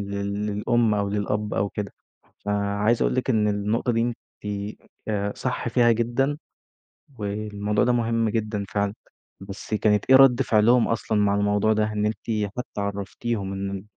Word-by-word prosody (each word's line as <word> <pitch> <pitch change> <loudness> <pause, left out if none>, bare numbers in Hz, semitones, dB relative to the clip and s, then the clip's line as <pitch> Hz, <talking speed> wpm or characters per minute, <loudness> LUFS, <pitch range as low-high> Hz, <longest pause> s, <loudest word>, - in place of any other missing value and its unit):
لل 100 +1 -3
للأم 110 +2 +1
أو 100 -1 0
للأب 105 +1 -2
أو 100 +1 0
كده. 100 0 -5 0.5
فعايز 105 +2 +1
أقول - - +1
لِك 130 +1 0
إن 110 -3 +2
النقطة 105 +4 0
دي 115 - +1
أنتِ 120 0 -1 0.9
آآ، 100 -1 -1
صح 125 -1 -2
فيها 120 0 +4
جدًا، 120 +5 0 0.8
والموضوع 105 0 -1
ده 125 - +3
مهم 115 -1 +1
جدًا 105 -2 -2
فعلًا. 100 -1 -1 0.5
بس 95 +2 -8
كانت 105 -1 +2
إيه 130 - +9
رَد 135 -1 +7
فعلهم 115 0 +4
أصلًا 110 -1 -1
مع 100 -1 +2
الموضوع 105 +1 +2
ده؟ 110 0 0
إن 105 0 0
أنتِ 105 -1 -2
حتى 125 -4 -4
عرّفتيهم 100 +1 -3
إن 95 0 -4
105 Hz, 155 wpm, -24 LUFS, 100-115 Hz, 0.9 s, إيه